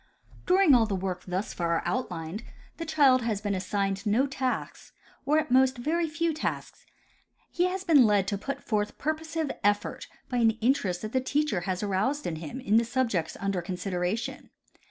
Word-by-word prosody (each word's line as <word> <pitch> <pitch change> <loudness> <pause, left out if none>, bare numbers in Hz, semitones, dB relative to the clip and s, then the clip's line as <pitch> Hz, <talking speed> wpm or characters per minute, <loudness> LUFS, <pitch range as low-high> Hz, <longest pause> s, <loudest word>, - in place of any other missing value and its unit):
During 365 -4 +5
all 230 -3 +5
the 200 - -1
work 185 -1 -4
thus 185 +3 -2
far 170 -1 0
outlined 180 -5 -3 0.4
the 330 - -5
child 280 -5 +5
has 225 -4 -1
been 205 -1 -2
assigned 195 +1 -1
no 220 +6 +2
tasks, 265 -2 -3 0.3
or 300 +2 +4
at 310 -4 0
most 260 0 +4
very 325 +7 0
few 325 +1 0
tasks. 310 - -5 0.6
He 350 - +1
has 370 +1 -2
been 295 -10 +6
led 200 -2 +2
to 200 - -1
put 275 +6 -5
forth 210 -2 -1
purposive 315 0 -2
effort 205 +1 0 0.2
by 250 - -2
an 225 -2 +3
interest 215 -7 +1
that 215 - -4
the 260 - +1
teacher 280 -7 0
has 185 +2 -1
aroused 210 +9 0
in 160 - -2
him 165 - -6
in 220 -4 +2
the 230 - +4
subjects 230 -9 -1
under 195 -2 -1
consideration. 180 +4 -3
225 Hz, 175 wpm, -28 LUFS, 195-280 Hz, 0.6 s, been